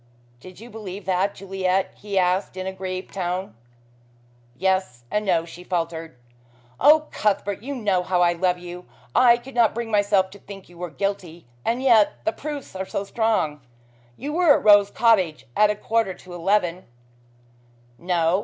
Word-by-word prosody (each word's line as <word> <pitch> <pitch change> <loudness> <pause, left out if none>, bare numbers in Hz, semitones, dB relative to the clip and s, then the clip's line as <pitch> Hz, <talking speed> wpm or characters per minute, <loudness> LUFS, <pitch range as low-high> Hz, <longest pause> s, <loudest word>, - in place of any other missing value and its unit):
"Did 185 +7 -13
you 235 +2 -12
believe 205 -3 -8
that, 190 +2 0
Juliet?" 190 -1 -1
he 200 -1 -5
asked 185 +1 +1
in 185 - -4
a 190 - -3
grieved 185 0 -6
tone. 185 - -3 1.0
"Yes 190 -10 0
and 210 - 0
no," 175 -5 +1
she 170 +1 -11
faltered. 165 -5 -3 0.6
"Oh, 305 +2 +6
Cuthbert, 205 -1 -1
you 280 +4 -5
know 205 -7 +1
how 180 0 0
I 175 0 +3
love 180 +1 0
you. 180 0 -9 0.3
I 240 -1 +6
could 255 +3 -12
not 235 -3 +3
bring 235 -1 -4
myself 200 -2 +2
to 200 - -13
think 195 -2 -12
you 175 -1 -16
were 180 0 -4
guilty 175 -1 -4 0.2
and 240 +3 -1
yet 230 -6 +5
the - - +1
proofs 290 -7 -7
are 190 0 -4
so 195 - -3
strong. 200 - 0 0.6
You 295 +1 -5
were 335 -3 +5
at - - -7
Rose 205 -1 +7
Cottage 185 - +2
at 210 0 +5
a 210 - 0
quarter 220 -2 -1
to 180 - -13
eleven 180 0 0 0.6
" 120 0 -33
"No. 175 0 +1
190 Hz, 175 wpm, -23 LUFS, 175-210 Hz, 1.0 s, Rose